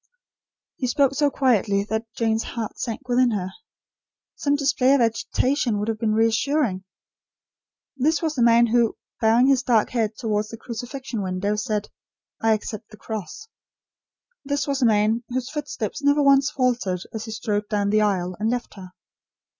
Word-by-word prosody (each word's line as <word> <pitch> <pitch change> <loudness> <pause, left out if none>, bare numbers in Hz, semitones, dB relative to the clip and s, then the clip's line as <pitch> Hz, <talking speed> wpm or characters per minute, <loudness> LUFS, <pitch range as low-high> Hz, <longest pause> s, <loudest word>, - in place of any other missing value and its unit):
He 255 - -2
spoke 275 +2 +2
so 290 +1 +2
quietly 220 -7 +2
that 220 +2 -4
Jane's 225 -1 +1
heart 230 -2 -5
sank 245 +3 -4
within 250 0 +3
her. 195 -5 -2 0.9
Some 285 0 +1
display 280 -1 +3
of 275 - +2
agitation 235 +1 0
would 210 +2 -2
have 220 -1 -2
been 215 -1 +1
reassuring. 225 -2 +1 1.1
This 290 +3 +1
was 320 -2 -1
the 260 - -2
man 235 0 +6
who, 235 -1 +2 0.2
bowing 230 +3 +4
his 270 -1 +4
dark 230 -5 +2
head 225 -3 -1
towards 215 -3 -1
the 230 - -8
crucifixion 245 0 -6
window, 190 +2 -1
said: 210 -1 -2 0.5
"I 225 0 +4
accept 215 +1 -5
the 215 - -14
cross." 220 - -7 1.0
This 280 0 -1
was 280 -1 -1
the 250 - +4
man, 220 +2 +2
whose 255 0 -3
footsteps 290 -8 -4
never 285 +1 +3
once 275 0 +5
faltered 245 -10 -1
as 220 0 -5
he 220 - -7
strode 210 -2 -2
down 205 -1 0
the 215 0 +3
aisle, 185 -3 0
and 215 +1 0
left 245 0 -3
her. 185 -1 -11
230 Hz, 165 wpm, -23 LUFS, 215-265 Hz, 1.1 s, man